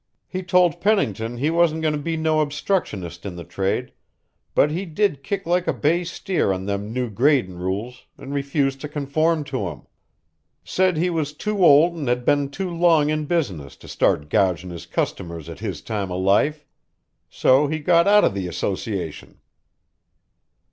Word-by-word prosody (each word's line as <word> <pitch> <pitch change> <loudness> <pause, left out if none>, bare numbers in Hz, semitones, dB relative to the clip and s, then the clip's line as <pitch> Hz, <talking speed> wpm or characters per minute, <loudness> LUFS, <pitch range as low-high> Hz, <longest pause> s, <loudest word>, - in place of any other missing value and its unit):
He 185 - -4
told 180 -3 +2
Pennington 120 - 0
he 145 +6 0
wasn't 165 -1 +2
goin' 155 -1 +2
to 150 - -2
be 165 +2 -2
no 160 -1 +1
obstructionist 145 - -2
in 95 -3 -6
the 85 - -7
trade, 95 +3 -2 0.6
but 150 - +4
he 175 +5 -2
did 180 -4 0
kick 195 +7 -3
like 175 +1 +1
a - - +2
bay 170 +4 +1
steer 175 - -1
on 95 0 -3
them 100 +1 -3
new 125 +1 -1
gradin' 115 -5 +1
rules 100 +7 -4
an' 135 - -9
refused 140 -1 -1
to 150 - -5
conform 150 +2 0
to 130 -9 -3
'em. 75 -6 -11 0.8
Said 185 -3 +1
he 175 +3 +1
was 155 -3 -2
too 205 +5 -1
old 165 +2 +6
an' 145 - -3
had 125 0 0
been 145 -1 +2
too 185 +5 -4
long 165 -3 +4
in 155 0 -1
business 95 - -2
to - - -15
start 75 - +1
gougin' 95 -3 +1
his 85 - -9
customers 85 -5 -3
at - - -9
his - - -5
time 100 -4 -3
o' 90 - -2
life. 105 +11 +2 0.6
So 135 +3 +3
he 155 +2 -2
got 170 +3 +3
out 210 +1 +6
o' - - +5
the 95 -2 -4
association." 90 0 -4
145 Hz, 175 wpm, -22 LUFS, 100-165 Hz, 0.8 s, old